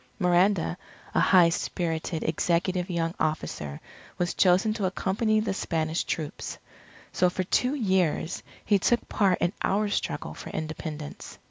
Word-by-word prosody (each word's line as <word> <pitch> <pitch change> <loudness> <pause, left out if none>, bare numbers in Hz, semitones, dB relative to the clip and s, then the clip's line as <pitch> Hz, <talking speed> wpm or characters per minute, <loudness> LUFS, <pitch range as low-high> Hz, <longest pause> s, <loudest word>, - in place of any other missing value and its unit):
Miranda, 180 0 +2 0.3
a - - +3
high 180 -3 +6
spirited, 165 -1 -2
executive 175 +3 0
young 165 -1 -1
officer 75 - -2 0.4
was 175 0 0
chosen 190 +4 +4
to 210 -3 -2
accompany 205 +4 +1
the 215 -2 -1
Spanish 160 -3 -1
troops. 155 -3 -4 0.5
So 180 - +3
for 185 +1 -2
two 250 +9 +1
years 185 - +1 0.2
he 205 -1 +4
took 240 +5 +1
part 195 -3 +2
in 175 - +1
our 205 +2 +1
struggle - - -2
for - - -9
Independence. 155 -1 -6
180 Hz, 135 wpm, -27 LUFS, 165-195 Hz, 0.5 s, high